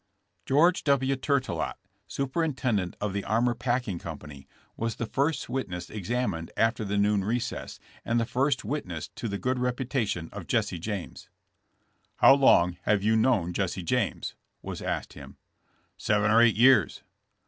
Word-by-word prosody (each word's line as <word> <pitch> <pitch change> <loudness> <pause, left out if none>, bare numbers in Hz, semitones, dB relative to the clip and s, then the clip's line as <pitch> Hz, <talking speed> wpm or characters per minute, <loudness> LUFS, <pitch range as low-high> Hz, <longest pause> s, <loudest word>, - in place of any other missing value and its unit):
" 100 - -47
George 165 +7 +3
TV. 135 -2 +2
Tourtellot, 135 0 -1 0.3
superintendent 130 - -1
of 105 -2 -2
the 100 0 -2
Armour 120 +3 +1
Packing 120 -7 -2
company, 75 -4 -9 0.3
was 115 0 -2
the 120 - -3
first 140 +7 -1
witness 90 -10 -4
ex 105 -2 -7
amined 100 -10 -1
after 115 0 +1
the 100 0 -2
noon 100 -1 +2
recess 115 +4 -3 0.2
and 115 +1 +1
the 115 - 0
first 130 +1 0
witness 95 - -4
to 115 - -6
the 100 -1 -3
good 125 +4 -1
reputation 125 - -1
of - - -8
Jesse 85 - 0
James. 100 0 -6 0.9
"How - - +7
long 90 -11 +4
have 105 -2 +2
you 110 +1 +3
known 110 -7 +2
Jesse 95 -1 -2
James?" 120 +3 -1 0.3
was - - -6
asked - - -3
him. - - -12 0.3
*' - - -41
Seven 105 0 +1
or 115 +1 +6
eight 120 -2 +5
years." 130 +3 +4
115 Hz, 160 wpm, -27 LUFS, 100-130 Hz, 0.9 s, How